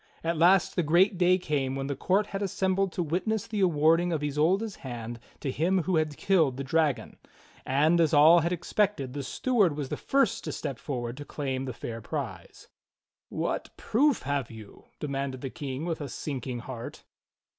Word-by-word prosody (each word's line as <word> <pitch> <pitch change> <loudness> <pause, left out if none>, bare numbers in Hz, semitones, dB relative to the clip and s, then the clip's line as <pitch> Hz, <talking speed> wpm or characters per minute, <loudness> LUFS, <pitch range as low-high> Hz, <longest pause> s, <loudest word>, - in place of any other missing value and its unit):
At 165 +1 0
last 175 +3 +4
the 180 - +2
great 175 +5 +3
day 180 0 +5
came 140 -6 -1
when 135 0 -3
the 140 0 -2
court 195 +7 +1
had 195 0 -5
assembled 190 0 0
to 175 - -1
witness 190 +7 -1
the 215 -2 -4
awarding 165 -1 +3
of 155 -3 -1
Isolda's 170 +9 +1
hand 120 -2 -7 0.2
to 135 - -2
him 175 +6 +1
who 180 +1 +1
had 155 -2 -1
killed 160 -10 +2
the 140 - -3
dragon; 140 -5 0 0.5
and, 155 +6 +3
as 165 - +3
all 160 +3 +7
had 170 +2 0
expected, 175 -5 0
the 145 - -3
steward 200 - +1
was 140 -3 -3
the - - -3
first 275 0 +1
to - - -3
step - - -5
forward 120 -3 -4
to 145 - -6
claim 135 -3 -3
the 130 - -4
fair 115 -1 -6
prize. 105 - -6 0.6
"What - - -3
proof 275 +3 +2
have 140 -2 -1
you.?" 110 -3 -12
demanded 135 -3 -3
the 135 - -5
King 145 -2 -5
with 165 -3 -3
a 145 - -5
sinking 130 -3 -5
heart. 120 -1 -8
155 Hz, 185 wpm, -28 LUFS, 135-180 Hz, 0.6 s, all